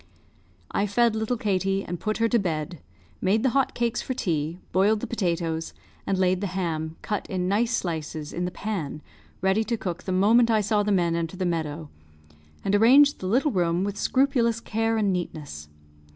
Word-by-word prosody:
I 205 Hz, -, 0 dB
fed 230 Hz, +2 st, +2 dB
little 220 Hz, +3 st, -1 dB
Katie 195 Hz, -1 st, 0 dB
and 175 Hz, 0 st, -5 dB
put 215 Hz, 0 st, -2 dB
her 230 Hz, -, +2 dB
to 235 Hz, 0 st, +2 dB
bed, 165 Hz, -3 st, -3 dB, 0.4 s
made 210 Hz, +4 st, +2 dB
the 260 Hz, -, +3 dB
hot 275 Hz, +1 st, +1 dB
cakes 235 Hz, -1 st, 0 dB
for 260 Hz, -, -4 dB
tea, 165 Hz, -5 st, -1 dB
boiled 205 Hz, +3 st, +3 dB
the -, -, -4 dB
potatoes, 170 Hz, -6 st, -2 dB, 0.3 s
and 195 Hz, -, +1 dB
laid 185 Hz, 0 st, +2 dB
the 200 Hz, -, -1 dB
ham, 160 Hz, -3 st, -2 dB
cut 210 Hz, -2 st, -3 dB
in 180 Hz, -1 st, -1 dB
nice 220 Hz, +5 st, +1 dB
slices, 160 Hz, -6 st, -3 dB
in 175 Hz, -, -2 dB
the -, -, -1 dB
pan, 180 Hz, -8 st, -4 dB, 0.4 s
ready 190 Hz, +3 st, +3 dB
to 235 Hz, 0 st, -1 dB
cook 180 Hz, -5 st, -4 dB
the 185 Hz, -, -4 dB
moment 220 Hz, +6 st, +4 dB
I 220 Hz, -2 st, +3 dB
saw 210 Hz, +1 st, +1 dB
the 205 Hz, 0 st, 0 dB
men 175 Hz, -3 st, +2 dB
enter 170 Hz, +2 st, -3 dB
the 185 Hz, -, -1 dB
meadow, 160 Hz, -3 st, -3 dB, 0.7 s
and 195 Hz, -, +1 dB
arranged 265 Hz, +8 st, +6 dB
the 185 Hz, -, -4 dB
little 265 Hz, +9 st, +2 dB
room 175 Hz, -2 st, +1 dB
with 200 Hz, 0 st, -2 dB
scrupulous 240 Hz, -1 st, +2 dB
care 225 Hz, 0 st, -1 dB
and 205 Hz, -3 st, +2 dB
neatness. 145 Hz, -, -5 dB
195 Hz, 190 wpm, -25 LUFS, 170-225 Hz, 0.7 s, arranged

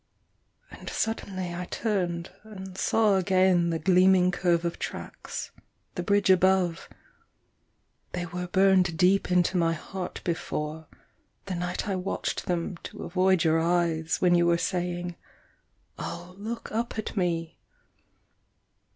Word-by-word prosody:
And -, -, -8 dB
suddenly 185 Hz, -5 st, -3 dB
I 180 Hz, +1 st, -4 dB
turned 180 Hz, -5 st, -2 dB
and 190 Hz, -3 st, -10 dB
saw 210 Hz, 0 st, +3 dB
again 185 Hz, -2 st, +3 dB
The 165 Hz, -, 0 dB
gleaming 185 Hz, +1 st, +4 dB
curve 175 Hz, -2 st, +1 dB
of 170 Hz, -, -3 dB
tracks, -, -, -6 dB, 0.4 s
the 180 Hz, -, -3 dB
bridge 200 Hz, +1 st, +3 dB
above 185 Hz, -2 st, +2 dB, 1.2 s
They 175 Hz, -1 st, -2 dB
were 180 Hz, +1 st, -5 dB
burned 185 Hz, -2 st, +3 dB
deep 185 Hz, +3 st, +3 dB
into 180 Hz, +1 st, +3 dB
my 165 Hz, -1 st, +2 dB
heart 180 Hz, +3 st, -6 dB
before, 160 Hz, -2 st, -3 dB, 0.6 s
The 195 Hz, -, -4 dB
night 180 Hz, +3 st, -3 dB
I 195 Hz, -, 0 dB
watched 185 Hz, +2 st, -3 dB
them 175 Hz, 0 st, -2 dB
to -, -, -9 dB
avoid 185 Hz, 0 st, +2 dB
your 160 Hz, 0 st, +3 dB
eyes, 165 Hz, -1 st, +1 dB
When 180 Hz, -1 st, +4 dB
you 175 Hz, 0 st, +4 dB
were 170 Hz, 0 st, +4 dB
saying, 175 Hz, -1 st, -2 dB, 0.8 s
"Oh, 175 Hz, +1 st, -6 dB
look 220 Hz, +4 st, -6 dB
up 230 Hz, +1 st, -2 dB
at 215 Hz, -, -4 dB
me!" 170 Hz, -4 st, -1 dB
180 Hz, 130 wpm, -27 LUFS, 170-190 Hz, 1.2 s, gleaming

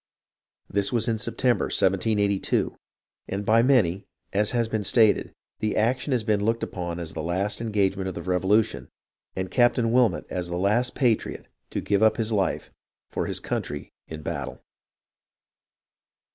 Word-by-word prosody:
This 100 Hz, 0 st, 0 dB
was 120 Hz, -2 st, +1 dB
in 115 Hz, -2 st, 0 dB
September, 125 Hz, +2 st, +1 dB
1782, 100 Hz, +1 st, +1 dB, 0.5 s
and 100 Hz, +1 st, -3 dB
by 115 Hz, +2 st, +5 dB
many, 105 Hz, -8 st, +3 dB, 0.3 s
as 105 Hz, +1 st, +2 dB
has 120 Hz, -2 st, +1 dB
been 110 Hz, -2 st, -2 dB
stated, 110 Hz, +1 st, +3 dB, 0.3 s
the 110 Hz, -, -1 dB
action 125 Hz, +6 st, +1 dB
has 125 Hz, -4 st, +1 dB
been 105 Hz, -2 st, +1 dB
looked 115 Hz, +2 st, 0 dB
upon 85 Hz, -2 st, -4 dB
as 85 Hz, -2 st, -5 dB
the 80 Hz, -, -4 dB
last 95 Hz, +7 st, -1 dB
engagement 100 Hz, -4 st, 0 dB
of 95 Hz, -, -4 dB
the -, -, -5 dB
Revolution, 95 Hz, +4 st, +1 dB, 0.5 s
and 95 Hz, -1 st, -3 dB
Captain 120 Hz, -2 st, +3 dB
Wilmot 115 Hz, -11 st, +3 dB
as 90 Hz, -1 st, -3 dB
the 85 Hz, -, -2 dB
last 105 Hz, +7 st, +1 dB
patriot 120 Hz, -5 st, 0 dB, 0.2 s
to -, -, -3 dB
give 100 Hz, 0 st, +1 dB
up 110 Hz, 0 st, +4 dB
his 115 Hz, 0 st, -1 dB
life 100 Hz, -3 st, -1 dB, 0.4 s
for -, -, -2 dB
his -, -, -1 dB
country 75 Hz, 0 st, -4 dB, 0.2 s
in 80 Hz, -1 st, -8 dB
battle. -, -, -5 dB
105 Hz, 155 wpm, -25 LUFS, 95-115 Hz, 0.5 s, by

